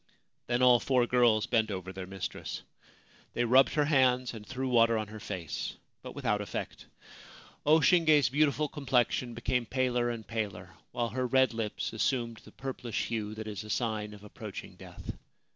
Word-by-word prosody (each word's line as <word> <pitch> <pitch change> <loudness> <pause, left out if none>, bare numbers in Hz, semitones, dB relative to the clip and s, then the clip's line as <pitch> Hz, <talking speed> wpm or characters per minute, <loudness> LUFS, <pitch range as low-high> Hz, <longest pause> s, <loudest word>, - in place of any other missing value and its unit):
Then 120 +1 +1
all 125 -1 +7
four 125 +1 +2
girls 120 -3 +3
bent 110 -2 +1
over 95 -1 -5
their 95 -1 -7
mistress. 95 0 -5 0.7
They 120 - +1
rubbed 130 +3 +5
her 150 -1 +3
hands 130 -4 +3
and 110 -2 -8
threw 130 +4 -4
water 115 -2 +4
on 110 -2 -3
her 110 0 -8
face, 90 -6 -5 0.2
but - - -9
without - - 0
effect. - - -6 0.8
O 160 +2 +6
Shinge's 155 -5 +5
beautiful 150 +2 +2
complexion 125 -4 0
became 120 0 -1
paler 125 -1 +1
and 115 -2 -5
paler, 105 -5 -4 0.2
while 120 -1 -1
her 130 +3 -1
red 130 -1 +3
lips 110 -1 -3
assumed 115 0 0
the - - -15
purplish 130 -3 -4
hue 110 -2 -3
that 110 0 -6
is 105 0 -5
a 105 - -11
sign 105 -2 -2
of 100 - -15
approaching 105 - -8
death. - - -9
120 Hz, 170 wpm, -30 LUFS, 110-130 Hz, 0.8 s, all